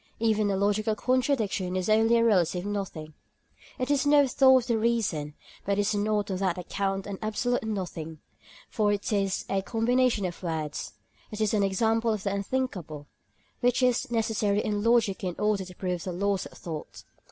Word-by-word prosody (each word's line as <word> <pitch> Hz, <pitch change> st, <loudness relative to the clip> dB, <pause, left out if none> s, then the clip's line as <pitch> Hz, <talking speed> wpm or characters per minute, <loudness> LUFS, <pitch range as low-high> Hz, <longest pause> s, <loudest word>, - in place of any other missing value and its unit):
Even 215 Hz, -2 st, +1 dB
a 195 Hz, -, 0 dB
logical 210 Hz, +2 st, +1 dB
contradiction 230 Hz, -7 st, 0 dB
is 185 Hz, -1 st, -1 dB
only 225 Hz, +2 st, +4 dB
a 230 Hz, -, +3 dB
relative 180 Hz, -4 st, +2 dB
nothing. 190 Hz, -7 st, -4 dB, 0.6 s
It 255 Hz, +3 st, -1 dB
is 280 Hz, -2 st, +2 dB
no 290 Hz, -1 st, +6 dB
thought 260 Hz, -1 st, +5 dB
of -, -, -11 dB
the 230 Hz, -, +2 dB
reason, 205 Hz, -11 st, 0 dB, 0.3 s
but 200 Hz, 0 st, 0 dB
it -, -, +3 dB
is 205 Hz, +1 st, 0 dB
not 205 Hz, 0 st, 0 dB
on 185 Hz, -, -1 dB
that 185 Hz, -2 st, 0 dB
account 195 Hz, +2 st, -2 dB
an 200 Hz, -2 st, -6 dB
absolute 245 Hz, +3 st, -1 dB
nothing; 175 Hz, -7 st, -4 dB, 0.5 s
for 210 Hz, -2 st, +1 dB
it 205 Hz, +2 st, -2 dB
is 195 Hz, -2 st, 0 dB
a 195 Hz, 0 st, 0 dB
combination 230 Hz, 0 st, +1 dB
of 175 Hz, -2 st, -5 dB
words; 160 Hz, -4 st, -4 dB, 0.4 s
it 215 Hz, -, -7 dB
is 215 Hz, 0 st, +1 dB
an 210 Hz, -, +2 dB
example 225 Hz, +4 st, +1 dB
of 210 Hz, -2 st, -4 dB
the 200 Hz, -, -1 dB
unthinkable, 200 Hz, -, -3 dB, 0.5 s
which 245 Hz, +1 st, +2 dB
is 250 Hz, +1 st, +2 dB
necessary 220 Hz, -3 st, +1 dB
in 205 Hz, -1 st, -1 dB
logic 230 Hz, -5 st, +2 dB
in 180 Hz, -2 st, -2 dB
order 210 Hz, -2 st, 0 dB
to 180 Hz, 0 st, -12 dB
prove 180 Hz, -2 st, -3 dB
the 185 Hz, -, -4 dB
laws 200 Hz, +1 st, -1 dB
of -, -, -16 dB
thought. 160 Hz, -3 st, -7 dB
205 Hz, 185 wpm, -27 LUFS, 190-230 Hz, 0.6 s, no